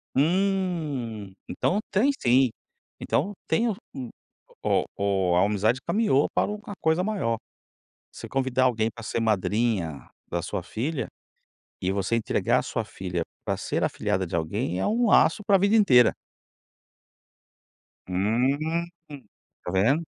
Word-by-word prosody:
Hum, 155 - 0
então 200 - 0
tem 220 +8 +3
sim. 125 +1 +4 0.5
Então 190 +9 0
tem 235 +1 +2
o 215 - -1 0.9
o - - +2
o 95 -3 +1
a 90 - +5
amizade 105 +4 +1
caminhou 205 -11 +3
para - - +1
uma 210 -1 -7
coisa 160 +2 +2
maior. 190 - -1 0.8
Você - - -9
convidar 130 -1 +1
alguém 115 -3 +2
para 115 +1 -11
ser 115 - -2
madrinha 105 -6 0 0.2
da 85 -1 -1
sua 95 - -3
filha 130 - -3 0.7
e 95 - 0
você 100 +3 0
entregar 115 - +1
a - - -1
sua - - -3
filha 90 -2 -4 0.2
para - - -1
ser - - -2
afilhada 95 0 0
de 85 - -4
alguém, 85 +2 -2
é - - 0
um 235 +2 +2
laço 210 - +4
para 200 - +4
a - - +5
vida 200 +3 +3
inteira. 125 - +6 1.9
Hum, 130 - 0 0.8
tá - - -4
vendo? 115 - +3
125 Hz, 135 wpm, -26 LUFS, -, 1.9 s, inteira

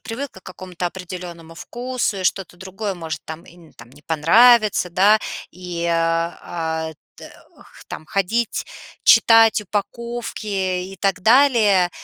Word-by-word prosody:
привыкла 240 -3 -7
к - - -47
какому-то 185 -1 -6
определенному 175 -2 -8
вкусу, 240 +2 -4
и 185 - -5
что-то 180 -1 -1
другое 195 +2 -5
может 165 -3 -6
там 160 +1 -9
и - - -17
н 170 -3 -18
там 120 - -15
не 145 +3 -19
понравится, 205 +6 +4
да, 200 +5 +4 0.3
и, 175 -1 -5
а-а, 165 -1 -2 0.2
т - - -12 0.3
х - - -17
там, 155 - -8
ходить, 215 +5 -1 0.4
читать 225 -3 +6
упаковки 225 +3 -5
и 190 -1 -3
так 195 0 0
далее- 220 -6 +4
185 Hz, 135 wpm, -20 LUFS, 170-220 Hz, 0.4 s, читать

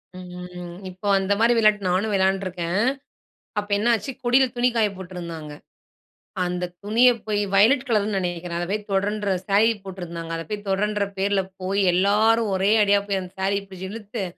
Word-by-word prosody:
ம். 180 -1 -8
இப்போ 185 +3 -7
அந்தமாரி 205 +5 +2
விளையாட்டு 210 -3 +3
நானும் 200 +4 0
விளையாண்டுருக்கேன். 190 -2 0 0.8
அப்போ 205 0 -7
என்னாச்சு 235 +4 +1
கொடில 250 +2 +4
துணி 245 +1 +3
காய 215 -2 +3
போட்டிருந்தாங்க. 170 -5 -7 0.9
அந்த 180 0 -2 0.2
துணிய 235 +4 +5 0.2
போய் 205 -1 0
வயலட் 250 +7 +4
கலருன்னு 210 -3 +1
நினைக்கிறேன். 175 -1 -4
அத 175 - -2
போய் 210 0 -3
தொடன்ற 205 +1 0 0.2
சாரி 205 +3 +4 0.2
போட்டிருந்தாங்க. 170 -3 -7
அதை 165 - -5
போய் 210 -1 -5
தொடன்ற 205 +1 +1
பேர்ல 195 0 +1 0.2
போய் 195 +2 0
எல்லாரும் 210 +4 +3
ஒரே 190 +2 +2
அடியா 200 0 +4
போய் 195 -2 -1
அந்த 180 - -10
சாரீ 200 +1 +1
பிடிச்சி 190 0 -8
இழுத்து 210 -3 -5
200 Hz, 150 wpm, -23 LUFS, 180-210 Hz, 0.9 s, துணிய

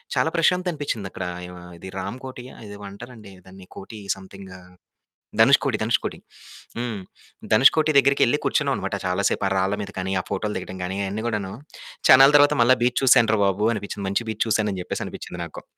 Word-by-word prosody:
చాలా 160 - +2
ప్రశాంతత 180 +2 +2
అనిపించింది 120 -10 -4
అక్కడ 90 - -6 0.2
ఆహ్, - - -9
య - - -10 0.3
ఇది 95 - -9
రాంకోటి 130 +4 -7
ఆ - - -14
ఇదేమో 100 0 -10
అంటారండి 110 -2 -12
దాన్ని 95 0 -14
కోటి 105 +2 -9 0.2
సమెథింగ్ 95 0 -12
ఆహ్, 90 0 -18 0.7
ధనుష్‌కోటి, 135 +1 +4
ధనుష్‌కొటి. 115 +1 -1 0.6
హ్మ్ 120 -4 -3 0.5
ధనుష్ 130 +5 +6
కోటి 155 0 +2
దగ్గరికెళ్లి 140 0 +3
కూర్చున్నాం - - +1
అనమాట - - -3
చాలా 90 +2 -1
సేపు 100 - -2
ఆ - - 0
రాళ్ళ 95 +2 +1
మీద 100 - -7
గాని 95 +1 -3
ఆ - - -19
ఫోటోలు 105 +2 -3
దిగడం 95 0 -7
గాని 95 +2 -4
అయన్నీ 105 +3 -4
గూడాను 100 -4 -3 0.6
చానల 135 +2 +9
తరువాత 145 +1 +4
మళ్ళా 130 +2 +5
బీచ్ 125 0 +1
చూశాను 120 -4 +5
రా - - -1
బాబు 100 +2 0
అనిపించింది. 100 -1 -6
మంచి 115 +4 -1
బీచ్ 110 - -1
చూశాను 105 -1 +1
అని 90 - -5
చెప్పేసనిపించింది 90 - -6
నాకు. 80 - -11
105 Hz, 185 wpm, -23 LUFS, 95-130 Hz, 0.7 s, చానల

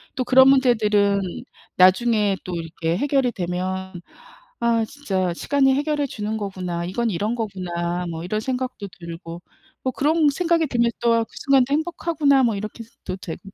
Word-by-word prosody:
또 255 - 0
그런 260 +1 +6
문제들은 215 -7 +3 0.6
나중에 205 +2 +4
또 180 - -5
이렇게 165 0 -3
해결이 270 -1 +1
되면 185 +1 -3 0.7
'아 230 -1 +2
진짜 195 -10 -2
시간이 270 +6 +2
해결해 290 +1 0
주는 215 -3 -4
거구나. 185 -4 -4
이건 230 +7 -1
이런 210 +5 -1
거구나.' 180 -5 -3
뭐 165 0 -5
이런 215 +5 -2
생각도 250 -3 -4
들고 170 0 -8 0.4
뭐 260 - -1
그런 305 +2 +2
생각이 335 +2 +1
들면 235 -3 +1
또 230 -1 +3
그 - - -29
순간도 270 -1 +3
'행복하구나.' 310 -3 +2
뭐 235 -3 +2
이렇게도 215 0 -7
되고 175 -3 -7
220 Hz, 325 characters per minute, -22 LUFS, 185-265 Hz, 0.7 s, 그런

